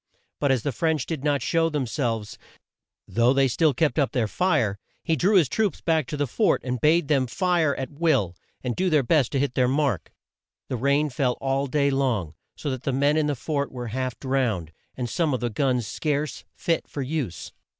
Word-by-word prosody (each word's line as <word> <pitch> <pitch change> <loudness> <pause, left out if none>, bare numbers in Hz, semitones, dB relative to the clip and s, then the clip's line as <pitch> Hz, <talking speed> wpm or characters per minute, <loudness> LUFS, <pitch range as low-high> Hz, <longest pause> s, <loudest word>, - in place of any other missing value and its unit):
But 140 - +2
as 130 -4 +1
the 145 - 0
French 155 0 0
did 155 -5 -4
not 145 -4 +1
show 165 +2 +2
them 150 -4 -1
selves, 115 -5 -3 0.7
though 120 +3 +3
they 135 0 +3
still 155 +5 +3
kept 155 +3 +1
up 140 - +1
their 120 -4 +1
fire, 105 - +1 0.2
he 165 - +1
drew 195 +8 +2
his 170 -7 +5
troops 210 - 0
back 160 -5 +1
to 150 - -4
the 145 - +1
fort 125 - +2
and 125 -1 -3
bade 160 0 +3
them 135 -3 +2
fire 170 0 +1
at 135 - -5
will, 140 - +1 0.3
and 125 -2 -2
do 185 0 +1
their 150 -4 +3
best 140 -1 +2
to 135 - +1
hit 140 -2 0
their 125 0 +2
mark. 135 - 0 0.6
The - - -1
rain 140 +4 +1
fell 125 -1 +1
all 135 +1 -1
day 140 +1 +1
long, 120 - 0 0.2
so 145 - -4
that 130 -2 -4
the 135 - -1
men 140 +3 +2
in 155 -1 +2
the 145 - 0
fort 140 +3 -2
were 125 -2 -5
half 130 +1 -3
drowned, 120 - -1 0.3
and 125 -2 -2
some 150 +2 0
of - - -3
the 120 0 -2
guns 125 0 0
scarce 150 +6 -2
fit 165 -1 -1
for 140 - -4
use. 130 - -4
140 Hz, 210 wpm, -25 LUFS, 125-155 Hz, 0.7 s, his